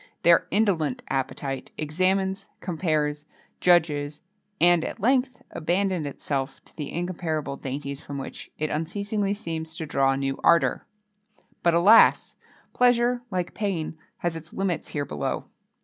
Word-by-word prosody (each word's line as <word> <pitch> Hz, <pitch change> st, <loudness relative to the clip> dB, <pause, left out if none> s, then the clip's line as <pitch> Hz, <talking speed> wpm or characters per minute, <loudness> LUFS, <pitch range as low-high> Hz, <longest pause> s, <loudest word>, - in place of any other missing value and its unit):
Their 170 Hz, 0 st, +5 dB
indolent 180 Hz, -9 st, +1 dB
appetite 135 Hz, 0 st, -3 dB
examines, 190 Hz, +5 st, 0 dB
compares, 155 Hz, -4 st, -1 dB, 0.3 s
judges, 150 Hz, -4 st, +2 dB, 0.4 s
and, 175 Hz, -1 st, +5 dB
at -, -, -5 dB
length, 255 Hz, +2 st, +1 dB
abandons 180 Hz, -1 st, 0 dB
itself 135 Hz, -1 st, -3 dB
to -, -, -20 dB
the 150 Hz, -3 st, -5 dB
incomparable 165 Hz, -4 st, -2 dB
dainties 140 Hz, +1 st, -5 dB
from 140 Hz, -, -7 dB
which 135 Hz, -, -8 dB
it 155 Hz, 0 st, -2 dB
unceasingly 200 Hz, +5 st, -1 dB
seems 160 Hz, -4 st, -5 dB
to 160 Hz, -, -4 dB
draw 135 Hz, -2 st, +2 dB
new 135 Hz, 0 st, -2 dB
ardour. 170 Hz, -6 st, +3 dB, 0.7 s
But 170 Hz, -1 st, +3 dB
alas! 200 Hz, +7 st, +6 dB, 0.4 s
pleasure, 245 Hz, 0 st, +3 dB
like 180 Hz, -3 st, -2 dB
pain, 185 Hz, -7 st, -2 dB, 0.2 s
has 175 Hz, -1 st, -2 dB
its 160 Hz, 0 st, -9 dB
limits 190 Hz, -3 st, -1 dB
here 145 Hz, -1 st, -2 dB
below. 75 Hz, -, -3 dB
165 Hz, 130 wpm, -26 LUFS, 150-190 Hz, 0.7 s, alas